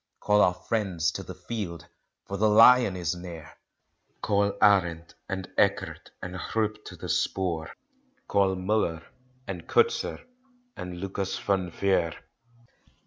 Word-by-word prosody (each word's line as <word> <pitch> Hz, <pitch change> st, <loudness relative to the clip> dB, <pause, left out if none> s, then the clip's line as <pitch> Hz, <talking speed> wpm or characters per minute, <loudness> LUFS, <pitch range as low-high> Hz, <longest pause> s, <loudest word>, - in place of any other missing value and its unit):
Call 105 Hz, 0 st, +3 dB
our 90 Hz, -, +4 dB
friends 90 Hz, -7 st, -1 dB
to 95 Hz, -, -5 dB
the 95 Hz, -1 st, -9 dB
field 90 Hz, -4 st, -5 dB, 0.4 s
for 100 Hz, -, -5 dB
the 105 Hz, +2 st, +3 dB
lion 115 Hz, -1 st, +7 dB
is 85 Hz, -2 st, -1 dB
near! 85 Hz, -4 st, -9 dB, 0.7 s
Call 100 Hz, -1 st, +1 dB
Arend 90 Hz, -5 st, +3 dB, 0.2 s
and 95 Hz, -1 st, -3 dB
Ekhard -, -, 0 dB
and 90 Hz, -, -5 dB
Groepe 110 Hz, +2 st, -2 dB
to -, -, -9 dB
the -, -, -8 dB
spoor; 85 Hz, -4 st, -1 dB, 0.6 s
Call 100 Hz, -2 st, +2 dB
Muller 90 Hz, -4 st, 0 dB, 0.4 s
and 90 Hz, -3 st, -6 dB
Coetzer 455 Hz, -, +1 dB, 0.5 s
and 90 Hz, -1 st, -7 dB
Lucas 95 Hz, 0 st, -3 dB
Van 95 Hz, -3 st, 0 dB
Vuur. 85 Hz, -3 st, +1 dB
95 Hz, 130 wpm, -27 LUFS, 85-105 Hz, 0.7 s, lion